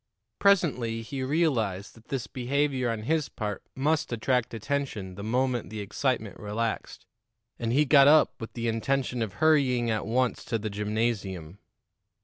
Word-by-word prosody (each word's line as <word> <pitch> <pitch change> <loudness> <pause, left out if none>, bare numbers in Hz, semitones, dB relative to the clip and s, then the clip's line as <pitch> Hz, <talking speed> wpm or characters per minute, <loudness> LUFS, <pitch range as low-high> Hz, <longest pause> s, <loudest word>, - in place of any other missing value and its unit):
Presently 125 - +2
he 135 +3 -5
realized 130 - 0
that 115 -1 -19
this 135 -4 -3
behavior 130 0 0
on 115 -2 -3
his 155 +3 0
part 105 -3 -4
must 155 +3 0
attract 120 +1 0
attention 115 -5 -3
the 95 - -8
moment 125 +2 0
the 110 - -6
excitement 110 +1 -2
relaxed, 110 +2 -3 0.5
and 115 -1 -1
he 145 +5 +4
got 140 0 +7
up 155 +1 +6
with 115 - -7
the 120 -1 -3
intention 125 +2 0
of 110 -4 -2
hurrying 130 -4 +3
at 105 -2 -2
once 125 +2 0
to 115 - -1
the 110 -1 -4
gymnasium. 100 -4 -2
120 Hz, 150 wpm, -27 LUFS, 110-135 Hz, 0.5 s, got